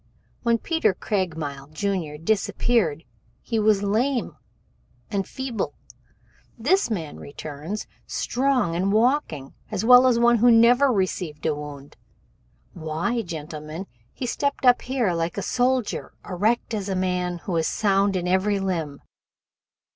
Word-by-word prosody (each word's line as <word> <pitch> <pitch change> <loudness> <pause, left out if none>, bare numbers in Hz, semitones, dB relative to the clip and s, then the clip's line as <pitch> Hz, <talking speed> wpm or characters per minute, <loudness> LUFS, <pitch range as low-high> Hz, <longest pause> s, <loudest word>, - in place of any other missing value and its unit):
When 235 -1 +2
Peter 230 - +1
Craigmile, 160 -10 -3
Jr., 160 -1 -2
disappeared 195 -2 +1 0.4
he 225 -2 -2
was 210 -2 +3
lame 235 +3 0 0.8
and 195 -2 -1
feeble. 260 -6 -4 0.8
This 330 - +2
man 170 -9 -4
returns, 150 +7 -6 0.2
strong 250 -9 0
and 190 +3 +1
walking 220 - +1 0.2
as - - -2
well 250 +1 +8
as 245 -2 +3
one 235 0 +5
who 245 +3 +6
never 245 +4 +6
received 185 -7 -2
a 160 - +2
wound. 145 -1 -9 0.8
Why, 170 +9 -2
gentlemen, 155 -1 -7 0.3
he 255 - -5
stepped 280 +2 -1
up 250 -1 +6
here 245 -8 0
like 165 +1 -2
a 200 - -2
soldier 250 0 0
erect 215 +6 0
as 205 -2 -3
a 190 - -1
man 180 -1 -1
who 180 - -3
is 160 - +1
sound 200 -1 +2
in 180 -1 -1
every 195 +2 +2
limb. 165 -7 -3
195 Hz, 130 wpm, -24 LUFS, 165-235 Hz, 0.8 s, well